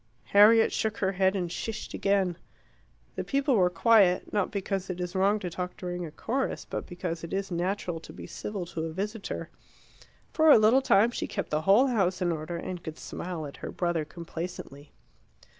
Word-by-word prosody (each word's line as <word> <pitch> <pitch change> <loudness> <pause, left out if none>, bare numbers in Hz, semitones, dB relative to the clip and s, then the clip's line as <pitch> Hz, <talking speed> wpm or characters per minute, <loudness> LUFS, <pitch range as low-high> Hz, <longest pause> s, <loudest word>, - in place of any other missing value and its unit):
Harriet 220 +3 +7
shook 220 -1 -1
her 190 -1 +1
head 190 0 +2
and 175 -3 -2
shished 220 +3 -5
again. 195 -3 +1 0.8
The - - -2
people 275 0 +1
were 180 -4 +4
quiet, 185 0 +3
not 205 -3 +1
because 195 -1 -3
it 180 -1 -4
is 180 0 -4
wrong 195 +2 +3
to 190 -4 -4
talk 180 +2 -5
during 175 -1 -4
a - - -10
chorus, 255 - -2
but - - -5
because 175 -2 -5
it 170 - -7
is 195 0 -2
natural 175 -1 -2
to - - -12
be - - -9
civil 190 +2 -5
to 165 -2 -4
a 160 - -5
visitor. 205 +4 -4 0.8
For 315 0 +4
a 290 - +9
little 220 +5 +5
time 235 -3 +4
she - - -3
kept - - -4
the 150 0 +1
whole 200 +10 +5
house 195 -8 +1
in 175 -1 +1
order, 165 +1 -4
and 180 +1 -5
could 160 -1 -7
smile 170 -3 -5
at 140 - -9
her - - -6
brother 175 -3 -1
complacently. 165 -3 -8
185 Hz, 190 wpm, -28 LUFS, 175-210 Hz, 0.8 s, a